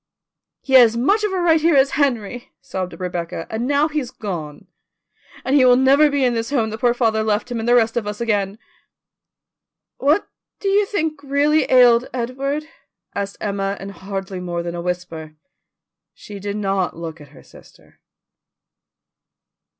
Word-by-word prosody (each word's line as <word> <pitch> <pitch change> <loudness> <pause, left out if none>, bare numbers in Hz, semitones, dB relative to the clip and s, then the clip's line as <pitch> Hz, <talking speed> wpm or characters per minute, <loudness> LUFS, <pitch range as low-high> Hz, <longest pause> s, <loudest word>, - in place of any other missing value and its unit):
"He 265 - -5
had 260 - +10
as 230 0 -1
much 400 - +2
of 420 - 0
a 380 - -1
right 325 -2 +3
here 330 -1 +3
as 270 0 +4
Henry," 245 -5 -1
sobbed 190 -9 -6
Rebecca, 175 -2 -4
"and 230 +3 -2
now 285 +2 +2
he's 300 -5 -3
gone, 170 - -7 0.8
and 265 - +1
he 275 - +6
will 250 -1 +6
never 275 +4 +5
be 280 -2 +1
in 245 - +2
this 230 +1 -2
home 230 -6 0
that 220 - -6
poor 245 -1 +2
father 225 -3 +1
left 215 +3 -1
him 235 - -2
and 225 +2 -2
the 245 - +5
rest 225 -2 +2
of 230 -3 -2
us 210 0 -5
again." 205 -3 -1 1.4
"What 300 +8 +2 0.3
do 395 - -1
you 400 +1 +3 0.3
really 285 +2 +2
think - - -8
ailed 245 -1 +6
Edward?" 270 +5 -3 0.5
asked 200 0 -4
Emma 200 -1 -2
in 195 - -7
hardly 195 -1 -6
more 175 -1 -4
than 170 0 -5
a 175 - -5
whisper. 170 -3 -5 0.8
She 205 -1 -10
did 200 +1 -4
not 195 -4 -1
look 165 -1 -7
at 145 - -13
her 140 - -17
sister. - - -19
230 Hz, 175 wpm, -20 LUFS, 195-275 Hz, 1.4 s, had